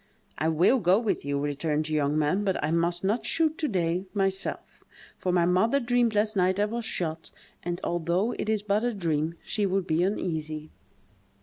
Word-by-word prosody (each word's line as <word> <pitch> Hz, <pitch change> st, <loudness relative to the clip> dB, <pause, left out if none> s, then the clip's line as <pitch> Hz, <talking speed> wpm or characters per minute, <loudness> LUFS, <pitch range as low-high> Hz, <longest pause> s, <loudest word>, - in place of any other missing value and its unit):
"I 155 Hz, -, +1 dB
will 175 Hz, +11 st, +4 dB
go 185 Hz, -1 st, +4 dB
with 225 Hz, -2 st, -1 dB
you," 140 Hz, 0 st, -1 dB
returned 150 Hz, +2 st, -1 dB
the 155 Hz, -, -4 dB
young 150 Hz, 0 st, +1 dB
man, 155 Hz, +7 st, +1 dB
"but 190 Hz, -2 st, 0 dB
I 150 Hz, -, 0 dB
must 170 Hz, +1 st, +1 dB
not 210 Hz, +5 st, +1 dB
shoot, 320 Hz, -1 st, +1 dB
to 310 Hz, -, 0 dB
day, 180 Hz, -2 st, -1 dB
myself; 195 Hz, -1 st, -2 dB, 0.4 s
for 185 Hz, -, 0 dB
my 175 Hz, -1 st, +3 dB
mother 190 Hz, +10 st, +3 dB
dreamed 240 Hz, -3 st, +1 dB
last 210 Hz, +1 st, +1 dB
night 185 Hz, 0 st, +2 dB
I 205 Hz, -, +3 dB
was 230 Hz, +2 st, -4 dB
shot; 165 Hz, -6 st, -3 dB, 0.3 s
and, 175 Hz, 0 st, -3 dB
although 175 Hz, +6 st, 0 dB
it -, -, -2 dB
is 215 Hz, -2 st, 0 dB
but 210 Hz, +1 st, +1 dB
a 240 Hz, -2 st, 0 dB
dream, 165 Hz, -3 st, -1 dB
she 205 Hz, -2 st, 0 dB
would 190 Hz, -1 st, 0 dB
be 160 Hz, -1 st, +1 dB
uneasy." 155 Hz, -5 st, -2 dB
180 Hz, 195 wpm, -27 LUFS, 160-210 Hz, 0.4 s, will